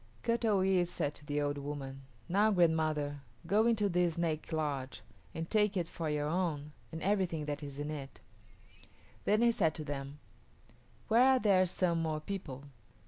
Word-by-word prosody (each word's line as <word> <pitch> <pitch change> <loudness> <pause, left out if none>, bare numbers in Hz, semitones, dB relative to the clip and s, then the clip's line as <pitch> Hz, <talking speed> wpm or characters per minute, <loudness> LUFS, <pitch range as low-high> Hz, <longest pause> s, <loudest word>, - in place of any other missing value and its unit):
Kut 235 0 0
o 205 -4 +3
yis´ 185 -2 +3
said 145 -4 -2
to 145 - -12
the 145 0 0
old 145 0 -1
woman, 140 -1 -6 0.3
"Now, 200 +5 +3
grandmother, 155 -6 +1 0.2
go 210 +6 +3
into 215 -3 +2
this 175 -3 +1
snake 165 -2 -2
lodge 145 -4 -2 0.3
and 165 0 -3
take 210 -1 +2
it 175 -2 -1
for 165 -2 -4
your 150 -1 0
own 155 -3 -1 0.2
and 160 0 -6
everything 185 -6 0
that 145 0 -3
is 140 -2 -7
in 145 +1 -3
it." 140 -3 -7 1.1
Then 215 +3 +3
he 235 - +6
said 160 -8 +1
to 155 - -5
them, 140 -1 -5 0.9
"Where 230 +2 +5
are - - +4
there 190 -4 +4
some 170 -2 0
more 155 -1 -1
people?" 155 -6 -6
160 Hz, 175 wpm, -33 LUFS, 145-190 Hz, 1.1 s, he